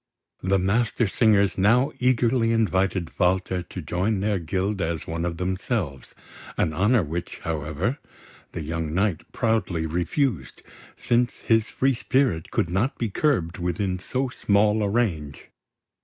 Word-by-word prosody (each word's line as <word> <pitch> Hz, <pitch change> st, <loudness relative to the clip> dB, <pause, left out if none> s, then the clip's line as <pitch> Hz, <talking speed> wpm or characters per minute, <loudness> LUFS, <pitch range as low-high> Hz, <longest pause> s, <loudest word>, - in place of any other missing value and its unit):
The 95 Hz, +1 st, +2 dB
Mastersingers 105 Hz, 0 st, +2 dB
now 120 Hz, +8 st, +4 dB
eagerly 125 Hz, -2 st, +2 dB
invited 95 Hz, -5 st, +1 dB
Walter 90 Hz, 0 st, +1 dB
to 90 Hz, -, -8 dB
join 95 Hz, +6 st, 0 dB
their 100 Hz, 0 st, 0 dB
guild 95 Hz, +4 st, -2 dB
as 80 Hz, -2 st, -2 dB
one 85 Hz, +1 st, -3 dB
of 85 Hz, -1 st, -3 dB
themselves, 90 Hz, -, -3 dB, 0.4 s
an 80 Hz, -, +1 dB
honour 105 Hz, +6 st, +3 dB
which, 85 Hz, +3 st, -5 dB
however, 80 Hz, -, -2 dB, 0.5 s
the 85 Hz, -, -4 dB
young 80 Hz, 0 st, -3 dB
knight 95 Hz, -3 st, -1 dB
proudly 110 Hz, -8 st, 0 dB
refused, 85 Hz, -, -1 dB, 0.3 s
since 120 Hz, 0 st, 0 dB
his 110 Hz, -1 st, +2 dB
free 135 Hz, +1 st, +1 dB
spirit 125 Hz, -8 st, 0 dB
could 85 Hz, -, -1 dB
not 105 Hz, +9 st, 0 dB
be 115 Hz, -, -1 dB
curbed 95 Hz, -, 0 dB
within 90 Hz, +2 st, -1 dB
so 130 Hz, +7 st, -2 dB
small 105 Hz, -2 st, +2 dB
a 100 Hz, -, +1 dB
range. 85 Hz, -, -2 dB
95 Hz, 135 wpm, -24 LUFS, 85-115 Hz, 0.5 s, now